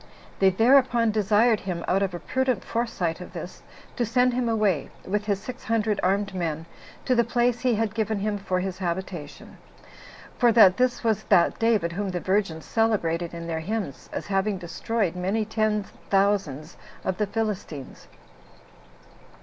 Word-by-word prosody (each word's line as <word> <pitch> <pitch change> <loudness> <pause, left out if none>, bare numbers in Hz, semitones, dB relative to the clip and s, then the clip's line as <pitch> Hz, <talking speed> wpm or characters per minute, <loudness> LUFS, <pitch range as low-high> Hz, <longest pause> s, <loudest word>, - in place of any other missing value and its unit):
They 195 - +6
thereupon 235 +2 +4
desired 215 +2 +3
him, 175 -3 -4
out 195 +2 +2
of 190 -2 -1
a - - -5
prudent 260 -2 -1
foresight 210 -8 -2
of 180 - -10
this, 175 +1 -8 0.4
to 245 - +1
send 250 +2 +2
him 245 -1 0
away, 210 -9 +1 0.2
with 205 +2 -1
his 200 -2 0
six 250 +5 -8
hundred 215 -2 0
armed 195 +1 0
men, 165 -3 -3 0.4
to 255 - +2
the 235 -1 +4
place 240 +1 +1
he 250 -3 +2
had 215 -1 -1
given 220 -1 -1
him 205 +1 -2
for 185 -2 -1
his 185 0 -4
habitation; 175 -4 -5 0.8
for 240 -1 +5
that 195 -5 +7
this 250 -1 +1
was 220 -3 0
that 180 -4 +3
David 220 -7 +2
whom 200 +3 -3
the 180 -1 -2
virgins 185 -4 -1
celebrated 175 -7 0
in 170 0 -7
their 165 -1 -2
hymns, 190 -4 -4
as - - -4
having 195 0 0
destroyed 185 +2 -2
many 195 +5 -1
ten 215 -1 0 0.3
thousands 195 -6 0 0.3
of 190 -1 -2
the 210 - +1
Philistines. 195 - -4
200 Hz, 165 wpm, -25 LUFS, 180-225 Hz, 0.8 s, that